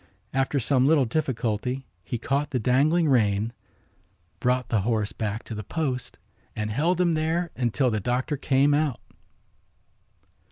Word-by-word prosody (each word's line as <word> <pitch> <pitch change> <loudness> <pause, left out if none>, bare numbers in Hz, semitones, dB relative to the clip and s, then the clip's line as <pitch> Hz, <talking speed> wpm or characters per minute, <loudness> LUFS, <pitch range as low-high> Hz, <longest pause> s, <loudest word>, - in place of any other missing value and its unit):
After 135 +1 +1
some 130 +1 +2
little 150 -3 +4
difficulty 125 -1 -2 0.2
he 120 - -3
caught 140 +5 -1
the 135 - -1
dangling 145 +8 +3
rein, 110 -4 +2 0.9
brought 125 -1 0
the 110 -4 +2
horse 110 -1 0
back 110 +1 -3
to - - -8
the 105 - -4
post 130 - -3 0.4
and 105 0 -2
held 165 +10 +1
him 175 -2 +3
there 160 +2 0
until 125 +1 +1
the 110 - 0
doctor 125 +6 -1
came 140 +1 +2
out. 145 -4 +1
130 Hz, 145 wpm, -26 LUFS, 115-145 Hz, 0.9 s, little